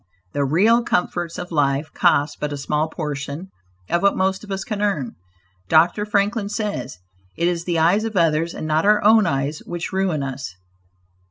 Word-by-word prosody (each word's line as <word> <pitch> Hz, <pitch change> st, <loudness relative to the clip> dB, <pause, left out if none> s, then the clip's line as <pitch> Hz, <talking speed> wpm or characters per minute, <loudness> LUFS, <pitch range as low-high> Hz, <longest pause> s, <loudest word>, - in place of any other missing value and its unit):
The 145 Hz, -, 0 dB
real 200 Hz, -, +4 dB
comforts 175 Hz, -5 st, -1 dB
of 175 Hz, 0 st, -6 dB
life 145 Hz, -1 st, 0 dB
cost 145 Hz, +1 st, +2 dB
but 150 Hz, -, -3 dB
a 145 Hz, -, -4 dB
small 150 Hz, +3 st, -1 dB
portion 150 Hz, +3 st, -5 dB, 0.4 s
of 170 Hz, -, 0 dB
what 200 Hz, 0 st, +3 dB
most 190 Hz, +1 st, 0 dB
of 205 Hz, -, -9 dB
us 195 Hz, 0 st, -2 dB
can 210 Hz, -2 st, -4 dB
earn. 160 Hz, -, -1 dB, 0.6 s
Dr. 175 Hz, +6 st, +3 dB
Franklin 205 Hz, +1 st, 0 dB
says 205 Hz, -, -4 dB, 0.4 s
"it 170 Hz, -, +1 dB
is 175 Hz, -1 st, -1 dB
the 175 Hz, -2 st, 0 dB
eyes 175 Hz, +7 st, +3 dB
of 220 Hz, -3 st, -3 dB
others 165 Hz, 0 st, +2 dB
and -, -, -5 dB
not 155 Hz, +1 st, +1 dB
our 210 Hz, +1 st, +4 dB
own 215 Hz, -1 st, +5 dB
eyes 140 Hz, +1 st, -1 dB
which 175 Hz, +2 st, -5 dB
ruin 185 Hz, -6 st, 0 dB
us. 130 Hz, -9 st, -6 dB
170 Hz, 180 wpm, -21 LUFS, 150-200 Hz, 0.6 s, own